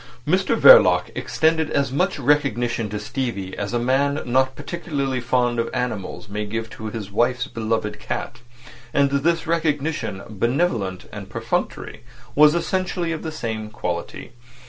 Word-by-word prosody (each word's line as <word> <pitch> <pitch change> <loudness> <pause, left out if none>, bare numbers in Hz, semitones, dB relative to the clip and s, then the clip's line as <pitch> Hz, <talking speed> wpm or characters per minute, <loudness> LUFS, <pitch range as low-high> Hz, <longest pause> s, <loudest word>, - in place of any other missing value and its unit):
Mr 190 +7 +2
Verloc - - +7
extended 160 -1 +1
as 140 -2 0
much 180 +8 0
recognition 120 -6 +1
to 105 - -4
Stevie 110 -9 -4
as 100 0 -4
a 120 - 0
man 135 +4 +1
not 130 +1 +2
particularly 145 -4 -3
fond 120 0 +1
of 115 - 0
animals 110 -5 -3
may 105 +1 -3
give 110 +2 -4
to 110 - -7
his 105 -2 -6
wife's 125 +4 +1
beloved 110 -3 -2
cat; - - -5 0.6
and 140 -1 +3
this 165 +4 +1
recognition, 155 - -1
benevolent 110 - -1
and - - -8
perfunctory, - - -3 0.3
was 150 +2 +6
essentially 180 0 -1
of 160 - -3
the 160 - -4
same 110 -7 -4
quality. 90 +1 -5
130 Hz, 145 wpm, -22 LUFS, 110-155 Hz, 0.6 s, Verloc